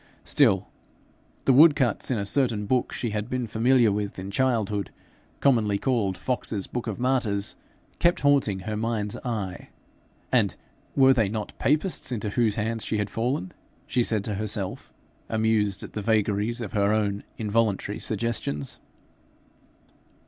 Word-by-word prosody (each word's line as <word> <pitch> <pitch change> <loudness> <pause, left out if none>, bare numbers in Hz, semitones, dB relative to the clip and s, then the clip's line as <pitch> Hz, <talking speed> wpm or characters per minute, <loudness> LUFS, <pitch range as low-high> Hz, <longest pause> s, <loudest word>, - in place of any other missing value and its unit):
Still, - - +3 0.8
the 135 - +5
wood 150 +3 +8
cuts 125 -7 0
in 125 - +1
a 100 - -2
certain 110 -2 +1
book 125 +4 +1
she 120 - -3
had 105 +2 -3
been 125 -1 -1
familiar 115 +1 +3
with 100 0 -3
in 95 +1 -6
childhood, 105 -5 0 0.5
commonly 110 -7 +3
called 105 -6 0
Fox's 110 -6 -2
Book 120 -1 -5
of 110 - -3
Martyrs, 120 -6 0 0.4
kept 175 +1 +3
haunting 135 -9 +2
her 110 +3 -4
mind's 110 -2 -2
eye 105 -7 -4 0.6
and - - +3 0.4
were 135 -1 +6
they 110 -6 +2
not 105 0 -4
Papists 150 -1 0
into 105 -3 -2
whose 110 -2 +2
hands 110 0 -2
she 110 - -1
had 105 -1 -2
fallen? 115 -5 -2 0.3
she 125 - +1
said 110 -3 +1
to 105 - -3
herself, 105 -2 -2 0.4
amused 110 -3 +1
at - - -9
the 105 - -3
vagaries 110 +2 +1
of 110 - -5
her 100 -1 +2
own 105 -2 0
involuntary 105 -2 0
suggestions. 105 -10 -2
110 Hz, 150 wpm, -26 LUFS, 100-120 Hz, 0.8 s, wood